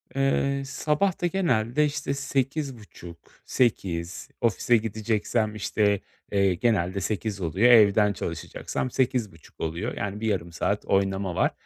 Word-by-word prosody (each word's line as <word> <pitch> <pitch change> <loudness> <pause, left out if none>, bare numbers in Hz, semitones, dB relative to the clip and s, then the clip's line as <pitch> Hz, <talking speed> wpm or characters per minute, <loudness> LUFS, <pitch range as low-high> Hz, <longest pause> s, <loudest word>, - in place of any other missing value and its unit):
Eee, 135 0 +1
sabah 150 +6 0
da 175 - +2
genelde 150 - +1
işte 145 -1 -2
8.30, 135 - -4 0.3
8.00. 90 -8 -1
Ofise 120 +1 +3
gideceksem, 110 0 -1
işte, 105 -1 +1 0.3
eee, 100 -2 +3
genelde 100 -2 0
8.00 105 0 -3
oluyor, 95 +9 +3
evden 105 -2 +6
çalışacaksam 85 +8 -4
8.30 120 - -2
oluyor. 85 +8 -3
Yani, 105 0 -3
bir 110 - -2
yarım 90 -5 -1
saat 85 - -1
oynama 95 -2 0
var - - +2
110 Hz, 125 wpm, -26 LUFS, 95-130 Hz, 0.3 s, evden